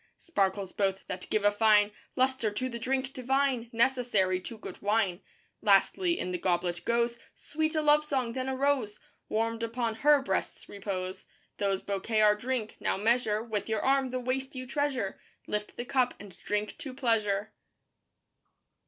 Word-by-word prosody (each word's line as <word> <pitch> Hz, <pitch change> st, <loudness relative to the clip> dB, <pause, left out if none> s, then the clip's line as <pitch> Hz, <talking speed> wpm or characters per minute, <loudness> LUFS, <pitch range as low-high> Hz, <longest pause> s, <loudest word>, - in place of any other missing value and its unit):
Sparkles 195 Hz, -, -1 dB
both 195 Hz, -1 st, -1 dB
that 180 Hz, 0 st, -6 dB
give 215 Hz, -, +1 dB
a 205 Hz, -, +6 dB
fine 210 Hz, -1 st, +4 dB, 0.2 s
Lustre 260 Hz, -3 st, +2 dB
to 230 Hz, +5 st, -2 dB
the 235 Hz, -1 st, -5 dB
drink 265 Hz, +2 st, -1 dB
divine, 260 Hz, -2 st, 0 dB
Necessary 230 Hz, -7 st, +2 dB
to 230 Hz, +4 st, -8 dB
good -, -, -9 dB
wine. 205 Hz, -3 st, +1 dB, 0.4 s
Lastly 340 Hz, -, +3 dB
in 180 Hz, -, -3 dB
the 180 Hz, -, -2 dB
goblet 175 Hz, -1 st, 0 dB
goes 235 Hz, 0 st, +1 dB, 0.2 s
Sweet 315 Hz, +1 st, -2 dB
a 310 Hz, -, +1 dB
love 300 Hz, 0 st, +5 dB
song, 260 Hz, -6 st, -1 dB
then 260 Hz, +1 st, -2 dB
a 265 Hz, -, -1 dB
rose 260 Hz, -6 st, 0 dB, 0.3 s
Warmed 225 Hz, +1 st, 0 dB
upon 230 Hz, 0 st, -1 dB
her 295 Hz, +4 st, +5 dB
breast's -, -, -2 dB
repose. 190 Hz, -2 st, -5 dB, 0.3 s
These 195 Hz, -1 st, 0 dB
bouquet 200 Hz, +2 st, -1 dB
our 210 Hz, -1 st, +6 dB
drink. 235 Hz, 0 st, -3 dB
Now -, -, 0 dB
measure 220 Hz, 0 st, +1 dB
With 220 Hz, -2 st, -3 dB
your 220 Hz, -1 st, 0 dB
arm 270 Hz, -1 st, +3 dB
the 255 Hz, 0 st, -2 dB
waist 265 Hz, +2 st, -2 dB
you 255 Hz, 0 st, -5 dB
treasure 265 Hz, -6 st, -2 dB, 0.2 s
Lift 210 Hz, 0 st, -3 dB
the 240 Hz, -, -4 dB
cup 255 Hz, -1 st, +1 dB
and 200 Hz, -2 st, -11 dB
drink 210 Hz, 0 st, -2 dB
to 265 Hz, -4 st, -7 dB
Pleasure. 215 Hz, -4 st, 0 dB
230 Hz, 165 wpm, -30 LUFS, 205-260 Hz, 0.4 s, a